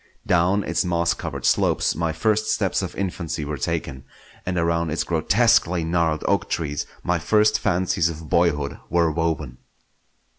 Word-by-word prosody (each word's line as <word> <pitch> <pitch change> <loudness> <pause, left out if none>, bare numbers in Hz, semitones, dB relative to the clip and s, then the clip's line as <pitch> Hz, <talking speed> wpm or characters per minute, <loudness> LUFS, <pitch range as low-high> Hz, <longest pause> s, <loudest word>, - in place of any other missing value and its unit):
Down 90 +4 +2
its 85 - 0
moss 85 -1 +1
covered 70 -7 -6
slopes - - +2
my 85 0 -1
first 110 +6 0
steps - - 0
of - - -5
infancy 85 -5 -3
were 75 -1 -4
taken, 65 +1 -3 0.4
and 90 -1 -1
around 85 -1 0
its 80 - -1
grotesquely 90 0 +2
gnarled 80 -2 0
oak - - +1
trees 75 -3 -2 0.2
my 90 0 0
first 105 +5 +3
fancies 90 -3 +1
of 80 -1 -8
boyhood 75 -4 +1
were 85 -1 +2
woven. 80 -6 -2
85 Hz, 150 wpm, -23 LUFS, 80-90 Hz, 0.4 s, first